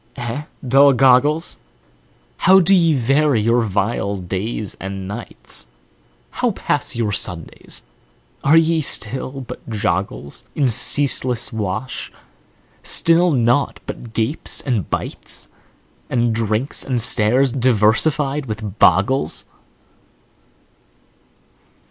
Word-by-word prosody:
eh, 120 Hz, +5 st, -5 dB, 0.2 s
dull 140 Hz, +2 st, +5 dB
goggles? 135 Hz, +6 st, +2 dB, 0.8 s
How 190 Hz, +1 st, +5 dB
do 190 Hz, +2 st, +3 dB
ye 165 Hz, -4 st, +3 dB
vary 135 Hz, +1 st, +1 dB
your 115 Hz, +3 st, +2 dB
vile 100 Hz, -1 st, -2 dB
days 95 Hz, +3 st, -4 dB
and 95 Hz, -1 st, -6 dB
nights? 110 Hz, +4 st, -6 dB, 0.6 s
How -, -, -1 dB
pass -, -, -3 dB
your 115 Hz, -3 st, -1 dB
Sundays? 90 Hz, -5 st, -3 dB, 0.6 s
Are 150 Hz, +4 st, +4 dB
ye 165 Hz, 0 st, +2 dB
still 130 Hz, +1 st, -1 dB
but 125 Hz, -, -10 dB
joggles 100 Hz, -8 st, -3 dB
In 140 Hz, -3 st, +1 dB
ceaseless 125 Hz, 0 st, +3 dB
wash? 110 Hz, +4 st, -4 dB, 0.7 s
Still 170 Hz, +2 st, +2 dB
naught 125 Hz, -1 st, +1 dB
but 120 Hz, -, -8 dB
gapes 115 Hz, +8 st, 0 dB
and 120 Hz, -, -2 dB
bites, -, -, -2 dB, 0.6 s
And 120 Hz, -2 st, 0 dB
drinks 110 Hz, +4 st, 0 dB
and 130 Hz, -3 st, -1 dB
stares, 125 Hz, +3 st, +4 dB
diversified 130 Hz, +4 st, +1 dB
with 105 Hz, -2 st, -7 dB
boggles? 95 Hz, -, +3 dB
120 Hz, 100 wpm, -19 LUFS, 105-140 Hz, 0.8 s, dull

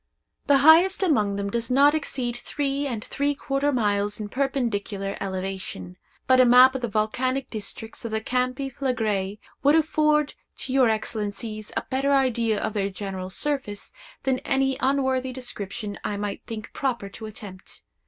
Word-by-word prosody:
The 285 Hz, -1 st, +6 dB
highest 330 Hz, +8 st, +6 dB
among 215 Hz, -, +2 dB
them 200 Hz, 0 st, -3 dB
does 235 Hz, +2 st, -1 dB
not 280 Hz, +3 st, +5 dB
exceed 260 Hz, -5 st, -2 dB
three 280 Hz, +2 st, -2 dB
and 230 Hz, -5 st, -4 dB
three 285 Hz, +1 st, 0 dB
quarter 275 Hz, +1 st, 0 dB
miles 205 Hz, -4 st, 0 dB
in 210 Hz, -1 st, -5 dB
perpendicular 220 Hz, -7 st, -2 dB
elevation; 190 Hz, -, -5 dB, 0.3 s
but 260 Hz, 0 st, +5 dB
a -, -, +9 dB
map 250 Hz, +2 st, +8 dB
of 265 Hz, -, -3 dB
the 240 Hz, -, -1 dB
volcanic 255 Hz, +5 st, -1 dB
districts 220 Hz, +1 st, -5 dB
of 230 Hz, -, -3 dB
the 220 Hz, 0 st, -1 dB
Campi 255 Hz, +3 st, -1 dB
Phlegraei 220 Hz, -7 st, -1 dB, 0.2 s
would 285 Hz, +3 st, +5 dB
afford 305 Hz, -2 st, +2 dB, 0.2 s
to 260 Hz, -, -4 dB
your 260 Hz, -3 st, +5 dB
Excellencies 215 Hz, 0 st, -3 dB
a -, -, -1 dB
better 270 Hz, +2 st, +2 dB
idea 235 Hz, -5 st, +2 dB
of 220 Hz, -, -2 dB
their 200 Hz, -2 st, 0 dB
general 190 Hz, -1 st, -5 dB
surface 270 Hz, -2 st, -3 dB, 0.3 s
than 265 Hz, -1 st, +1 dB
any 270 Hz, 0 st, +1 dB
unworthy 260 Hz, -1 st, +1 dB
description 210 Hz, -5 st, -6 dB
I 205 Hz, -, -2 dB
might 205 Hz, 0 st, -4 dB
think 215 Hz, -2 st, -7 dB
proper 240 Hz, -7 st, -2 dB
to 220 Hz, +2 st, -8 dB
attempt. 200 Hz, -3 st, -11 dB
240 Hz, 160 wpm, -25 LUFS, 205-270 Hz, 0.3 s, a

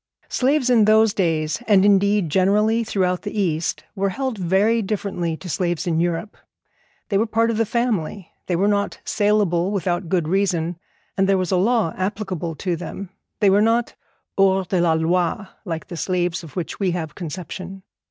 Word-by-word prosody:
Slaves 265 Hz, 0 st, +1 dB
in 225 Hz, -4 st, +5 dB
those 220 Hz, 0 st, +4 dB
days, 160 Hz, -2 st, 0 dB
and, 200 Hz, -3 st, +5 dB
indeed, 200 Hz, -3 st, +3 dB
generally 210 Hz, +6 st, +3 dB
throughout 185 Hz, -4 st, 0 dB
the 210 Hz, +1 st, -4 dB
East, 165 Hz, -4 st, -1 dB
were 195 Hz, 0 st, 0 dB
held 260 Hz, +4 st, -3 dB
very 200 Hz, +5 st, +2 dB
differently 190 Hz, -5 st, -2 dB
to 185 Hz, -, -10 dB
slaves 175 Hz, +1 st, -1 dB
in 165 Hz, -2 st, 0 dB
Europe. 175 Hz, +4 st, -2 dB, 0.7 s
They 200 Hz, -2 st, +2 dB
were 225 Hz, -, +1 dB
part 230 Hz, +1 st, +1 dB
of 220 Hz, -, -2 dB
the 225 Hz, -1 st, +1 dB
family, 210 Hz, -6 st, -2 dB, 0.2 s
and 175 Hz, -2 st, 0 dB
were 200 Hz, -, +3 dB
not 205 Hz, -1 st, 0 dB
saleable 205 Hz, -4 st, +1 dB
without 180 Hz, -3 st, -2 dB
good 175 Hz, -4 st, +1 dB
reason, 175 Hz, -2 st, 0 dB, 0.4 s
and 195 Hz, 0 st, +1 dB
there 195 Hz, -, +4 dB
was 185 Hz, -2 st, -1 dB
a -, -, +3 dB
law 210 Hz, -1 st, +2 dB
applicable 185 Hz, -4 st, -3 dB
to 180 Hz, +1 st, -2 dB
them. 180 Hz, +3 st, -7 dB, 0.3 s
They 200 Hz, -2 st, +5 dB
were 200 Hz, +2 st, +4 dB
not 230 Hz, +2 st, +2 dB, 0.5 s
hors 190 Hz, -1 st, +4 dB
de 180 Hz, -1 st, 0 dB
la 170 Hz, -2 st, +3 dB
loi, 170 Hz, +4 st, 0 dB, 0.2 s
like 165 Hz, -3 st, -4 dB
the 175 Hz, -, -7 dB
slaves 180 Hz, 0 st, -1 dB
of 160 Hz, -, -12 dB
which 180 Hz, -4 st, -4 dB
we 195 Hz, -2 st, +1 dB
have 160 Hz, -3 st, -5 dB
conception. 185 Hz, +2 st, -7 dB
190 Hz, 180 wpm, -22 LUFS, 175-210 Hz, 0.7 s, in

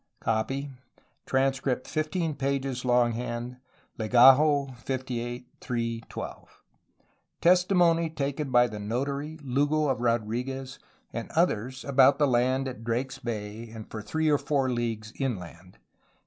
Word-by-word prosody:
Copy. 135 Hz, +6 st, -1 dB, 0.6 s
Transcript 130 Hz, -1 st, 0 dB
15 155 Hz, +1 st, -1 dB
pp. 135 Hz, -2 st, -2 dB
long 120 Hz, -1 st, +3 dB
hand. 120 Hz, +1 st, -4 dB, 0.4 s
Legajo 135 Hz, +4 st, +5 dB
58 125 Hz, -1 st, -4 dB
3 115 Hz, -1 st, -2 dB
12. -, -, -9 dB, 0.8 s
Testimony 175 Hz, -2 st, +4 dB
taken 145 Hz, -1 st, -3 dB
by 120 Hz, -1 st, +5 dB
the 105 Hz, -3 st, -5 dB
notary 140 Hz, +8 st, -3 dB
Lugo 145 Hz, +3 st, +1 dB
of 130 Hz, -2 st, -1 dB
Rodriguez 125 Hz, +3 st, -2 dB, 0.3 s
and -, -, -5 dB
others 130 Hz, +5 st, 0 dB
about 135 Hz, 0 st, +5 dB
the 150 Hz, -, +4 dB
land 130 Hz, +1 st, +2 dB
at 125 Hz, -3 st, -7 dB
Drake's 120 Hz, +3 st, -2 dB
Bay 110 Hz, 0 st, -5 dB
and 110 Hz, -1 st, -10 dB
for 110 Hz, -, -5 dB
three 160 Hz, +9 st, -1 dB
or 145 Hz, -2 st, +4 dB
four 135 Hz, -3 st, 0 dB
leagues 115 Hz, -2 st, -3 dB
inland. 95 Hz, -8 st, -5 dB
130 Hz, 120 wpm, -27 LUFS, 120-140 Hz, 0.8 s, Legajo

